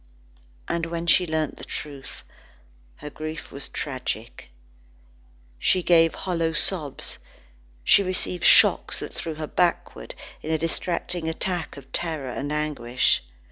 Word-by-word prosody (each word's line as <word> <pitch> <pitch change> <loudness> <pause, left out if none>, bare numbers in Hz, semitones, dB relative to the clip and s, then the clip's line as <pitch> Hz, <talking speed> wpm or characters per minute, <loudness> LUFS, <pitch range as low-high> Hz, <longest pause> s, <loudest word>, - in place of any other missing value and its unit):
And 165 -1 -1
when 170 0 -3
she 180 +1 +4
learnt 155 -2 -1
the - - -9
truth, 140 -3 -7 0.7
her 150 0 -9
grief 155 +2 -6
was 140 - -5
tragic. 130 - -5 1.1
She 185 - +2
gave 165 -2 +5
hollow 165 -3 -1
sobs, 155 -4 0 0.6
she 200 - +6
received 185 -2 -1
shocks - - +6
that - - -5
threw 160 -1 -5
her 155 0 -4
backward, 175 +3 -1 0.3
in 155 - -6
a 160 - +3
distracting 165 +1 -2
attack 175 -1 -2
of 135 -1 -13
terror 155 -7 -1
and 140 +4 -4
anguish. 135 -5 +1
160 Hz, 130 wpm, -25 LUFS, 145-170 Hz, 1.1 s, she